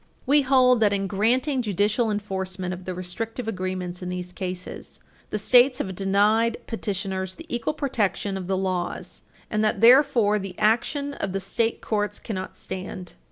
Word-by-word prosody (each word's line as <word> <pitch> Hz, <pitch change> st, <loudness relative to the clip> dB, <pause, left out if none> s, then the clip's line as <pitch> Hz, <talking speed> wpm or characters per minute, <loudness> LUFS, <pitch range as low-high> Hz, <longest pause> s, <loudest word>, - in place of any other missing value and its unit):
We 290 Hz, +2 st, +5 dB
hold 255 Hz, -2 st, +4 dB
that, 210 Hz, -2 st, +3 dB
in 195 Hz, 0 st, 0 dB
granting 250 Hz, +8 st, +1 dB
judicial 215 Hz, +2 st, +1 dB
enforcement 190 Hz, -3 st, -3 dB
of 180 Hz, 0 st, -9 dB
the 185 Hz, -, -4 dB
restrictive 225 Hz, +6 st, -5 dB
agreements 185 Hz, -3 st, -3 dB
in 180 Hz, -, -4 dB
these 180 Hz, 0 st, -5 dB
cases, 180 Hz, -2 st, -6 dB, 0.3 s
the -, -, -2 dB
States 250 Hz, +5 st, +5 dB
have 190 Hz, -10 st, -3 dB
denied 205 Hz, +4 st, +2 dB
petitioners 190 Hz, -3 st, -3 dB
the 325 Hz, -, -11 dB
equal 240 Hz, +3 st, -2 dB
protection 210 Hz, -8 st, -1 dB
of 185 Hz, -2 st, -5 dB
the 190 Hz, 0 st, 0 dB
laws, 185 Hz, -2 st, -3 dB, 0.3 s
and 215 Hz, 0 st, +1 dB
that, 215 Hz, -, +1 dB
therefore, 230 Hz, -4 st, +5 dB
the 195 Hz, -2 st, -7 dB
action 280 Hz, +6 st, +1 dB
of 195 Hz, -8 st, -4 dB
the 195 Hz, -, 0 dB
state 225 Hz, +4 st, -1 dB
courts 210 Hz, -1 st, -1 dB
cannot 190 Hz, -4 st, -6 dB
stand. 185 Hz, -1 st, -6 dB
205 Hz, 160 wpm, -25 LUFS, 185-230 Hz, 0.3 s, We